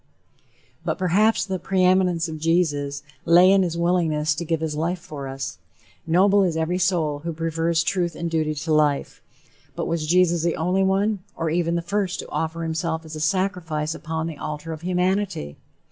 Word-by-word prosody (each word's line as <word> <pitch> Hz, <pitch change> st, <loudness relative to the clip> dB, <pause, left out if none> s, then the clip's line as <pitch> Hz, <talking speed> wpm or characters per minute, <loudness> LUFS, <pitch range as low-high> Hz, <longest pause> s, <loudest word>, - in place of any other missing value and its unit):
But -, -, -1 dB
perhaps 200 Hz, +5 st, +2 dB
the 190 Hz, -2 st, -3 dB
"preeminence 185 Hz, -2 st, +2 dB
of 160 Hz, -1 st, -6 dB
Jesus" 145 Hz, -4 st, 0 dB, 0.2 s
lay 180 Hz, +3 st, +6 dB
in 195 Hz, 0 st, +5 dB
his 170 Hz, -2 st, -1 dB
willingness 165 Hz, -3 st, +1 dB
to 165 Hz, +4 st, -4 dB
give 165 Hz, -1 st, -1 dB
his 155 Hz, -1 st, -3 dB
life 170 Hz, +4 st, -1 dB
for 145 Hz, -5 st, -8 dB
us. 135 Hz, 0 st, -5 dB, 0.5 s
Noble 195 Hz, +4 st, +4 dB
is 175 Hz, -4 st, +1 dB
every 165 Hz, +3 st, 0 dB
soul 170 Hz, -5 st, +1 dB
who 170 Hz, +3 st, -4 dB
prefers 165 Hz, 0 st, 0 dB
truth 175 Hz, -2 st, -1 dB
and 170 Hz, -, -3 dB
duty 155 Hz, -2 st, 0 dB
to 155 Hz, +2 st, -2 dB
life. 150 Hz, -2 st, +1 dB, 0.5 s
But -, -, -2 dB
was 165 Hz, -2 st, -2 dB
Jesus 175 Hz, 0 st, +3 dB
the 170 Hz, 0 st, 0 dB
only 180 Hz, +4 st, +1 dB
one, 195 Hz, +2 st, +1 dB, 0.2 s
or 165 Hz, -1 st, -2 dB
even 170 Hz, 0 st, +1 dB
the 170 Hz, -, -1 dB
first 195 Hz, 0 st, -1 dB
to -, -, -11 dB
offer 160 Hz, +1 st, -2 dB
himself 160 Hz, 0 st, -2 dB
as 155 Hz, 0 st, -8 dB
a -, -, -5 dB
sacrifice 160 Hz, -2 st, -1 dB
upon 160 Hz, -1 st, -4 dB
the 165 Hz, -3 st, -5 dB
altar 150 Hz, +2 st, -5 dB
of 155 Hz, -, -8 dB
humanity? 180 Hz, -, -1 dB
165 Hz, 180 wpm, -23 LUFS, 155-180 Hz, 0.5 s, lay